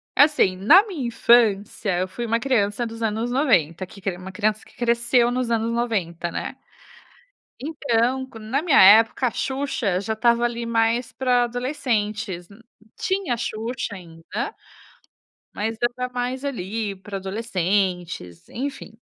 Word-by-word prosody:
Assim, 285 -10 +4
na 315 - +7
minha 300 - -4
infância, 215 -5 +2
eu 185 - 0
fui 235 +6 -5
uma 230 0 +1
criança 230 -3 0
dos 230 0 -8
anos 225 +2 -1
90, 185 - +2
que 195 +2 -15
cre 190 -2 -3
uma 185 +1 -9
criança 215 +2 0 0.2
cresceu 235 0 +2
nos 250 -1 -1
anos 230 0 0
90, 190 -8 -2
né. - - -4 1.0
Então 260 -3 0
com 230 - -12
na 225 +7 -1
minha 320 -5 +4
época 225 +6 +6
a - - -1
Xuxa 265 -10 -1
já 220 +3 -2
estava 235 +1 +2
ali 235 0 -2
mais 230 +1 +1
para 250 -2 +2
adolescentes, 225 - -2
nu 200 +2 -16 0.4
tinha 380 -8 -1
a - - -2
Xuxa 225 0 -4
ainda, 180 - -6 1.0
mas 220 +2 -3
já 240 - +4
tá 250 0 -3
mais 250 +2 -3
ali 220 -5 -3
para 195 +1 -9
adolescentes, 185 - -2
enfim. 255 -4 -6
230 Hz, 145 wpm, -23 LUFS, 200-245 Hz, 1.0 s, na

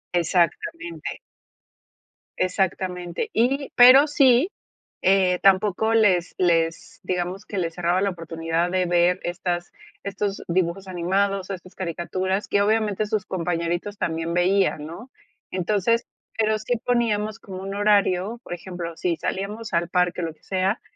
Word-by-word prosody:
Exactamente. 325 - -1 1.2
Exactamente. 185 -2 -1
Y, 270 +5 +1
pero 260 +4 +8
sí, 275 +3 +4 0.5
eh, 185 -1 +3
tampoco 200 +3 +3
les 190 -6 +3
les, 165 -2 0
digamos, 180 +2 -3
que 205 - -6
les 170 -3 -1
cerraba 175 +1 +1
la 200 - +2
oportunidad 165 0 -2
de 185 0 +1
ver 175 +1 +3
estas- 175 0 -3 0.3
estos 200 0 -3
dibujos 180 +2 -1
animados, 190 +2 0
estas 185 -1 -8
caricaturas, 185 +3 -2
que 200 - +2
obviamente 215 0 +1
sus 210 -2 -2
compañeritos 175 +2 -2
también 165 -1 -2
veían, 180 -3 +2
¿no?, 170 - -9 0.4
entonces, 210 +5 +1 0.3
pero 220 -1 +2
sí 240 +3 -1
poníamos 215 -4 0
como 190 -1 -8
un 195 +1 -5
horario, 205 +1 +2
por - - -6
ejemplo, 175 -2 -6
si 175 -2 0
salíamos 210 +6 -4
al 170 0 +1
parque, 180 0 +1
lo 165 -2 -3
que - - -34
sea, 190 +3 -1
185 Hz, 130 wpm, -24 LUFS, 175-210 Hz, 1.2 s, pero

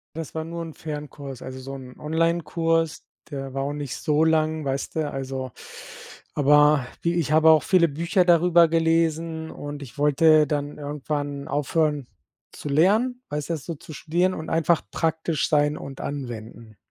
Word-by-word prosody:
Das 160 -1 -6
war 160 - -2
nur 170 +1 -6
'n 165 -1 -8
Fernkurs, 145 -4 -7
also 130 0 -7
so 135 +1 -7
'n 130 -2 -10
Onlinekurs, 165 0 0 0.2
der 135 -3 -6
war 135 0 -2
auch 140 - -2
nicht 145 -3 -5
so 155 +1 +1
lang, 155 -1 +1
weißt 135 0 -3
du, 155 -2 0
also 130 -1 -4 0.8
aber 150 -1 +5 0.2
wie 170 - +1
ich 165 -4 0
habe 160 +1 +6
auch 155 -1 +6
viele 180 -3 +4
Bücher 170 +4 +1
darüber 170 0 +5
gelesen 165 0 0
und 145 0 -7
ich 135 0 -11
wollte 150 +1 +5
dann 145 0 -3
irgendwann 145 -1 -4
aufhören 150 -1 0 0.4
zu - - -8
lernen, 215 - +3
weißt 150 0 -4
du, - - 0
das 155 -3 -5
so 170 - -4
zu 155 - -12
studieren 175 +5 0
und 160 -2 -6
einfach 165 0 +2
praktisch 160 -1 0
sein 150 0 +2
und 135 -1 -8
anwenden. 115 -5 -7
150 Hz, 165 wpm, -24 LUFS, 145-165 Hz, 0.8 s, habe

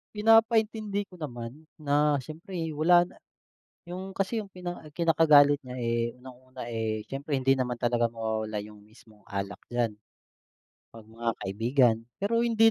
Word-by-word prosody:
Pinapaintindi 220 -1 +3
ko 180 -4 -16
naman 125 +3 -7
na 145 0 +2
siyempre 160 +7 -8 0.2
wala 175 +3 +5
na - - -17 0.6
yung 185 +2 -7
kasi 200 +4 0
yung 210 - -6
kina 180 -4 -7
kinakagalit 150 -4 +5
niya, 125 0 -7
eh, 115 0 -1
unang-una, 130 0 -11
eh, 110 -1 -2
siyempre 140 +1 -3
hindi 135 0 +3
naman 125 -1 -1
talaga 120 0 +1
mawawala 110 -2 -3
yung 105 0 -12
mismong 110 -1 -20
alak 100 0 -4
diyan. 120 -2 0 1.0
'Pag 115 -1 -11
mga 115 +1 -2
kaibigan, 115 +4 +2 0.3
pero 230 +3 +2
hindi 225 -1 +5
140 Hz, 140 wpm, -28 LUFS, 115-180 Hz, 1.0 s, wala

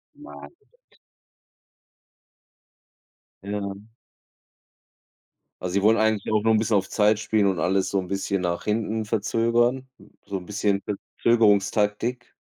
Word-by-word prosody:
Nein. 295 +4 -12 2.9
Ja. 100 0 -4 1.9
Also, 90 0 -4
sie 100 - +2
wollen 110 +2 +5
eigentlich 110 -1 0
auch 105 0 +2
nur 115 - +3
ein 110 - +4
bisschen 110 -1 +1
auf 95 -1 0
Zeit 105 0 +3
spielen 105 -1 +1
und 95 -4 0
alles 95 +3 +1
so 100 - 0
ein 90 - -5
bisschen 100 0 -2
nach 85 -1 -2
hinten 110 +1 -1
verzögern, 115 +4 +1 0.4
so 100 - -4
'n 90 - -9
bisschen 100 0 -1
Verzögerungstaktik? 105 +2 0
105 Hz, 120 wpm, -24 LUFS, 100-110 Hz, 2.9 s, wollen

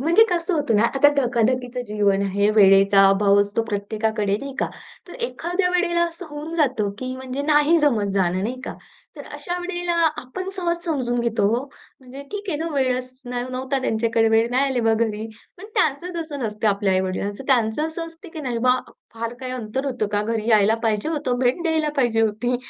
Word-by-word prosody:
म्हणजे 340 +10 +5
कसं 345 +1 0
होतं 290 -8 +1
ना, 210 - +4
आता 275 +2 +6
धकाधकीचं 250 -1 0
जीवन 205 -2 +1
आहे. 200 +1 +1
वेळेचा 195 0 +6
अभाव 200 +1 +4
असतो 205 +3 0
प्रत्येकाकडे, 210 0 -1
नाही 275 -1 -7
का? - - 0 0.4
तर - - -10
एखाद्या 360 -2 -1
वेळेला 350 -1 +1
असं 340 +1 -7
होऊन 300 +3 -6
जातं 255 -9 +1
की 255 0 -4
म्हणजे 260 +1 -5
नाही 300 +2 +4
जमत 220 -10 +1
जाणं, 185 -1 +1
नाही 250 +4 -3
का? - - -6 0.4
तर - - -8
अशा 355 0 -4
वेळेला 350 -1 -3 0.3
आपण 370 +9 -7
सहज 345 -1 -2
समजून 250 -7 -1
घेतो 230 -3 +1
हो. 255 - -3 0.4
म्हणजे 260 +2 -10
ठीक 410 -1 -6
आहे 300 - -1
ना, 325 +2 -2
वेळच 255 -2 0
न 245 0 -6 0.2
नव्हता 260 +2 -2
त्यांच्याकडे, 225 -1 +1
वेळ 225 +1 +3
नाही 255 +3 +2
आले 250 - 0
बा 225 - +4
घरी. 220 -1 -1 0.3
पण 375 - -10
त्यांचं 350 - 0
तसं 310 -3 -6
नसतं, 215 0 -2
आपल्या 200 -1 +1
आई-वडिलांचं, 190 +5 -2
त्यांचं 250 +2 +2
असं 330 +1 -5
असतं 330 +3 -13
की 315 - -6
"नाही 250 -4 -2
बा, 250 0 +4 0.4
फार 230 +1 -4
काही 255 -1 -5
अंतर 255 +2 -4
होतं 245 -6 -1
का? 205 - +1
घरी 225 0 -2
यायला 215 0 +5
पाहिजे 220 +3 0
होतं. 290 -6 -1
भेट 255 +7 +1
द्यायला 320 -2 +1
पाहिजे 240 -4 +2
होती." 225 +3 0
250 Hz, 195 wpm, -22 LUFS, 215-305 Hz, 0.4 s, आता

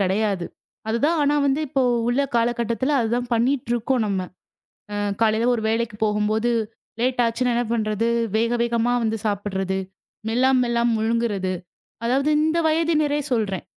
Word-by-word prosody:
கிடையாது. 195 -1 0 0.4
அதுதான், 285 +9 +1
ஆனா 290 +1 +2
வந்து 280 +2 +1
இப்போ 270 -1 +1 0.3
உள்ள 250 +4 +2
காலகட்டத்துல 235 +4 0
அதுதான் 240 +1 -1
பண்ணிட்டு 245 +1 0
இருக்கோம் 240 +1 0
நம்ம. 195 -2 -1 0.7
அ - - -3 0.3
காலையில 225 +1 +2
ஒரு 220 - -2
வேலைக்குப் 225 -1 -2
போகும்போது 215 +2 +1 0.5
லேட்டாச்சுனா 245 0 +1
என்ன 240 - +1
பண்றது, 220 0 0 0.3
வேக 230 +1 +1
வேகமா 235 0 +1
வந்து 225 0 0
சாப்பிடுறது. 195 -2 -2 0.5
மெல்லாம 260 +3 +3
மெல்லாம 235 0 +1
முழுங்குறது. 220 -4 0 0.5
அதாவது 270 +5 +1
இந்த 315 +2 +1
வயதினரே 310 -2 +1
சொல்றேன். 205 -6 -1
235 Hz, 130 wpm, -23 LUFS, 215-255 Hz, 0.7 s, மெல்லாம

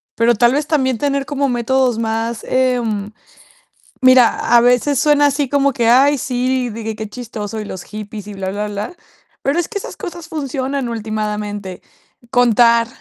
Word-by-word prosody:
pero 235 +1 +3
tal 240 +3 +3
vez 295 +1 -1
también 260 -6 +1
tener 280 +1 -1
como 280 -1 -1
métodos 245 0 +1
más, 225 0 -2
em, 240 -6 0 0.9
mira, 255 -2 +4
a 235 - +7
veces 250 +3 +3
suena 290 -1 +4
así 285 -1 -1
como 280 0 +2
que: 235 -2 0
"Ay, 275 +4 +5
sí, 255 0 -1
de 225 +1 -7
que 220 0 -4
qué 215 0 -6
chistoso 220 -2 -6
y - - -7
los 190 -3 -7
hippies 210 -1 -8
y 210 - -7
bla, 190 -1 -4
bla, 210 +1 -3
bla", 205 - -5 0.5
pero 280 +5 0
es 345 - -1
que 450 - -4
esas 400 - -7
cosas 345 -2 -7
funcionan 275 -3 -3
ultimadamente. 210 -3 -4 0.5
Contar, 235 -2 +4
240 Hz, 170 wpm, -18 LUFS, 215-275 Hz, 0.9 s, a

